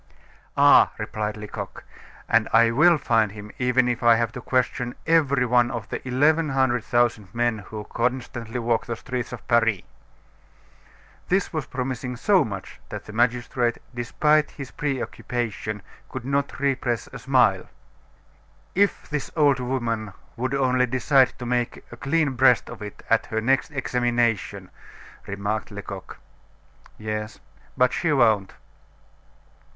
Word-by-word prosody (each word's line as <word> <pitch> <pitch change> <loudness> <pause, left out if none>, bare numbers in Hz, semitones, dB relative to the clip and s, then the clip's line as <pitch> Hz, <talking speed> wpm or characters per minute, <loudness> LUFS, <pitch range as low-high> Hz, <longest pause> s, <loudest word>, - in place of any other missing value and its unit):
"Ah!" 145 0 +7
replied 110 0 -3
Lecoq, 105 -1 -7 0.4
"and - - +3
I 115 0 +5
will 165 +7 +5
find 115 -7 +1
him 105 0 -9
even 125 0 +2
if 120 -1 -1
I 120 -1 +6
have 115 0 0
to 125 - -8
question 125 0 -1
every 140 -6 +3
one 120 0 +3
of 120 -5 -5
the - - -4
eleven 150 +5 +3
hundred 130 -3 +1
thousand 120 -5 0
men 120 -2 +1
who 105 +1 -8
constantly 120 0 -3
walk 115 0 0
the 115 - -2
streets 125 +1 -5
of 125 - -9
Paris!" 115 -5 +2 1.4
This 190 0 0
was 155 -3 -3
promising 125 -1 -4
so 190 - +3
much 100 -4 -7
that - - -7
the 105 - -10
magistrate, 120 +1 +1 0.2
despite 150 +5 +2
his 135 -3 -9
preoccupation, 120 -6 -3 0.3
could 130 -2 -6
not 140 +1 -1
repress 130 -4 0
a - - -7
smile. - - +2 1.0
"If 200 +2 +1
this 150 -2 -3
old 145 -4 +4
woman 115 -5 -2 0.2
would 130 +3 -2
only 130 -2 +2
decide 130 +1 +3
to 125 - -7
make 120 0 -1
a - - -8
clean 150 +2 +1
breast 125 -1 +3
of - - -10
it 105 -1 -8
at - - +3
her 110 - -1
next 135 +7 +1
examination!" 120 - -1 0.6
remarked 100 +2 -3
Lecoq. 100 -2 -8 0.8
"Yes. 110 0 -5 0.4
But 125 0 +3
she 160 - 0
won't." 110 -8 +2
120 Hz, 140 wpm, -24 LUFS, 115-135 Hz, 1.4 s, Ah